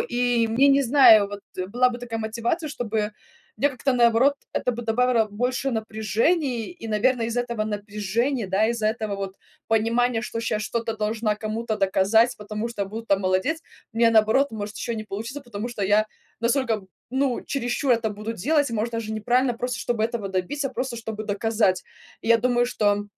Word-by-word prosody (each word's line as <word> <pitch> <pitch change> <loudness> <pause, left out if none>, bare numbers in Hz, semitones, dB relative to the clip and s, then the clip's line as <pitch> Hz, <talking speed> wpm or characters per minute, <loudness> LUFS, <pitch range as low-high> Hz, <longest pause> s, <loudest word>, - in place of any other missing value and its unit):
И 240 -1 +1
мне, 240 +5 +4
не 280 0 +5
знаю, 235 -6 +7
вот 205 0 -7 0.3
была 250 +4 +3
бы 240 - -6
такая 235 -2 -5
мотивация, 230 +9 -2
чтобы 220 -5 -2 0.4
мне 285 - +3
как-то, 270 0 -1
наоборот, 240 +3 +4 0.2
это 250 - 0
бы 240 0 -5
добавило 230 0 +2
больше 250 +5 -1
напряжений. 225 +4 0
И, 335 -10 -9
наверное, 230 +2 +1
из 230 +1 -4
этого 235 -2 -1
напряжения, 210 +3 -2
да. 195 +3 +2
Из-за 225 -2 0
этого 215 -2 -2
вот 195 -1 -5 0.3
понимания, 230 +1 +2
что 230 -1 -4
щас 220 -2 -1
что-то 225 0 -2
должна 215 0 -1
кому-то 220 +1 -3
доказать. 200 +4 +3
Потому 210 +1 -4
что 225 -4 -3
буду 220 +4 -7
там 195 -2 +2
молодец, 190 - 0 0.3
у - - -14
меня, 230 -1 +5
наоборот, 225 +5 +4
может 210 -2 -5
еще 235 -1 -3
не 215 - -5
получится. 225 +7 -6
Потому 240 -3 -6
что 225 -5 -3
я 210 +2 +3 0.3
настолько, 235 -2 +1 0.3
ну 265 -1 0
чересчур 255 0 0
это 225 -2 +1
буду 210 +2 -5
делать. 285 - +1
Может, 225 +1 -1
даже 225 -1 -3
неправильно. 245 +4 +1
Просто 245 +1 -3
чтобы 240 -2 -1
этого 225 -3 -2
добиться, 195 +10 -2
просто 255 -1 -4
чтобы 220 -2 -5
доказать. 210 -2 0 0.4
И - - -9
я 230 0 +6
думаю, 245 +1 +2
что, 205 -4 +1
230 Hz, 180 wpm, -24 LUFS, 215-245 Hz, 0.4 s, знаю